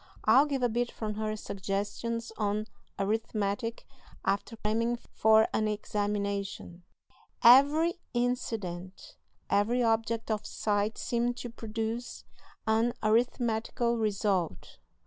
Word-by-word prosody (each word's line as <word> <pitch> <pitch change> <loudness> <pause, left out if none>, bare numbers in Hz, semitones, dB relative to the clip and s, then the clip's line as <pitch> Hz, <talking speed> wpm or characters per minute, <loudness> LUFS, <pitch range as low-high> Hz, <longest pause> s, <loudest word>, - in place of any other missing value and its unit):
I'll 260 +7 +6
give 275 -3 -1
a - - +5
bit 240 +1 -1
from 215 -1 -4
her 215 0 -2
"Suggestions 210 +4 -3
on 210 0 -1 0.3
Arithmetic 215 +1 -1 0.4
after 200 +4 -1
Cramming 230 +3 0 0.2
for 220 0 +5
an 215 - +1
Examination": 200 -3 -3 0.6
"Every 290 +8 +6
incident, 220 -7 -3 0.3
every 235 +5 +2
object 225 0 0
of 215 -1 -1
sight 210 +1 -1
seemed 240 0 -1
to 245 -1 -6
produce 225 +1 -4 0.4
an 225 +2 +2
arithmetical 235 +1 +1
result. 200 -5 -1
220 Hz, 105 wpm, -30 LUFS, 205-235 Hz, 0.6 s, I'll